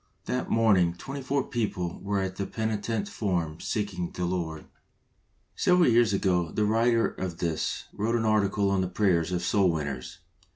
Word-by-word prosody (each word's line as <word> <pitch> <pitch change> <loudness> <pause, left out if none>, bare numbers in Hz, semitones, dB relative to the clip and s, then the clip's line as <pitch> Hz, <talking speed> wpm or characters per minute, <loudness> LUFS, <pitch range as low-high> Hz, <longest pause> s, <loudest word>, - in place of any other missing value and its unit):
That 125 - -2
morning 95 -7 +3
twenty 135 +8 -6
four 135 +1 0
people 95 -9 -3
were 100 0 -1
at 95 0 -4
the 100 - -2
penitent 110 -1 -2
form 85 -8 -2
seeking 100 -5 -2
the 90 - -3
Lord! 85 -3 -3 0.9
Several 180 -2 +4
years 120 -2 +4
ago 90 -4 +1
the 105 - +1
writer 115 +2 +3
of 90 -3 -5
this 85 -2 -2
wrote 115 +3 0
an 115 -1 0
article 100 -2 +2
on 95 -1 +2
the 90 - 0
prayers 90 -3 +1
of 90 -1 -1
soul 95 0 +3
winners. 70 -6 -3
100 Hz, 165 wpm, -27 LUFS, 90-110 Hz, 0.9 s, Several